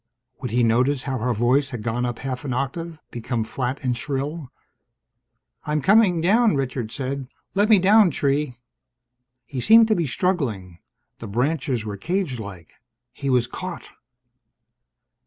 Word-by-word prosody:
Would 125 Hz, -, -3 dB
he 120 Hz, +2 st, +1 dB
notice 125 Hz, +4 st, +2 dB
how 135 Hz, -3 st, -3 dB
her 125 Hz, +3 st, 0 dB
voice 125 Hz, +5 st, +2 dB
had 120 Hz, -5 st, -6 dB
gone 120 Hz, +2 st, -1 dB
up 120 Hz, -1 st, -4 dB
half 130 Hz, -1 st, -5 dB
an 135 Hz, -3 st, -3 dB
octave, 155 Hz, +5 st, -3 dB
become 120 Hz, -1 st, -2 dB
flat 125 Hz, +4 st, -3 dB
and 125 Hz, -2 st, 0 dB
shrill? 140 Hz, +3 st, -4 dB, 1.1 s
"I'm 150 Hz, 0 st, -1 dB
coming 190 Hz, 0 st, +4 dB
down," 215 Hz, +3 st, +4 dB
Richard 125 Hz, -4 st, -3 dB
said. 135 Hz, -1 st, -4 dB, 0.3 s
"Let 205 Hz, +2 st, +2 dB
me 215 Hz, -, +7 dB
down, 200 Hz, +2 st, +5 dB
tree." 140 Hz, -3 st, 0 dB, 0.9 s
He 130 Hz, -3 st, -5 dB
seemed 225 Hz, -, +7 dB
to 215 Hz, -, +4 dB
be 170 Hz, -5 st, 0 dB
struggling. 120 Hz, -, -2 dB, 0.4 s
The 115 Hz, -, -7 dB
branches 125 Hz, +1 st, -1 dB
were 105 Hz, -1 st, -5 dB
cagelike. 115 Hz, -, -4 dB, 0.4 s
He 140 Hz, -, -4 dB
was 125 Hz, -2 st, +3 dB
caught! 185 Hz, +7 st, -7 dB
135 Hz, 145 wpm, -23 LUFS, 120-165 Hz, 1.1 s, me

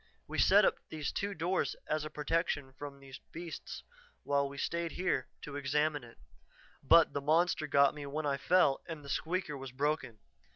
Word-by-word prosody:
We -, -, -3 dB
set -, -, +6 dB
up -, -, +2 dB
these 155 Hz, -2 st, -3 dB
two 200 Hz, 0 st, -3 dB
doors 175 Hz, +4 st, 0 dB
as 155 Hz, 0 st, -1 dB
a 155 Hz, -, -5 dB
protection 150 Hz, -2 st, -1 dB
from 140 Hz, +1 st, -8 dB
the 135 Hz, -1 st, -14 dB, 0.2 s
beast 170 Hz, 0 st, -7 dB, 0.4 s
while 140 Hz, -1 st, +1 dB
we 140 Hz, -, -10 dB
stayed 170 Hz, +3 st, -2 dB
here 180 Hz, -8 st, 0 dB, 0.2 s
to 145 Hz, -, -7 dB
examine 145 Hz, +1 st, 0 dB
it. 115 Hz, -1 st, -14 dB, 0.6 s
But 165 Hz, -1 st, +6 dB
the 140 Hz, -, -2 dB
monster 155 Hz, +2 st, +2 dB
got 140 Hz, -1 st, +4 dB
me 145 Hz, -1 st, -7 dB
when 150 Hz, +2 st, -3 dB
I 140 Hz, -1 st, +1 dB
fell 170 Hz, -4 st, +3 dB
and 160 Hz, -3 st, -7 dB
the -, -, -9 dB
'squeaker' 165 Hz, 0 st, -2 dB
was 135 Hz, -1 st, -7 dB
broken. 140 Hz, -3 st, -1 dB
150 Hz, 180 wpm, -33 LUFS, 140-165 Hz, 0.6 s, set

